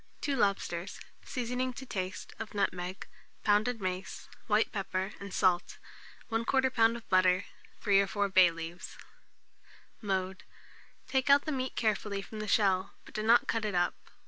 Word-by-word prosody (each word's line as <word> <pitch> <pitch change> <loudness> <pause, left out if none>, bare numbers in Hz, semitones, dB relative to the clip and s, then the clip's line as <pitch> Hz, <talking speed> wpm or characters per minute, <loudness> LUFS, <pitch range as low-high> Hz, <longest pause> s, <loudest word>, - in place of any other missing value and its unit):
2 285 - 0
lobsters; 200 -4 -1 0.2
seasoning 250 0 -2
to 265 +2 -9
taste, 185 -5 -5
of 220 -1 -7
nutmeg, 185 -2 -2 0.4
pounded 215 +3 +2
mace, 185 -1 -4 0.2
white 215 0 +2
pepper, 190 0 -3
and 200 -1 -8
salt; 180 -2 +1 0.5
1/4 225 +1 +1
lb. 250 -3 +3
of 235 - -13
butter, 185 0 +3 0.4
3 200 -1 +4
or 200 - 0
4 205 0 0
bay 185 -2 +6
leaves. 165 +1 -8 1.0
Mode. 190 -2 -2 0.6
Take 265 0 0
out 280 0 +6
the 310 - -2
meat 260 -2 -3
carefully 210 -2 -1
from 215 - -8
the 215 - -4
shell, 195 -3 +2
but - - -14
do 215 - -2
not 230 +2 +5
cut 225 -1 0
it 210 -3 -2
up. 175 0 +2
205 Hz, 155 wpm, -31 LUFS, 185-230 Hz, 1.0 s, bay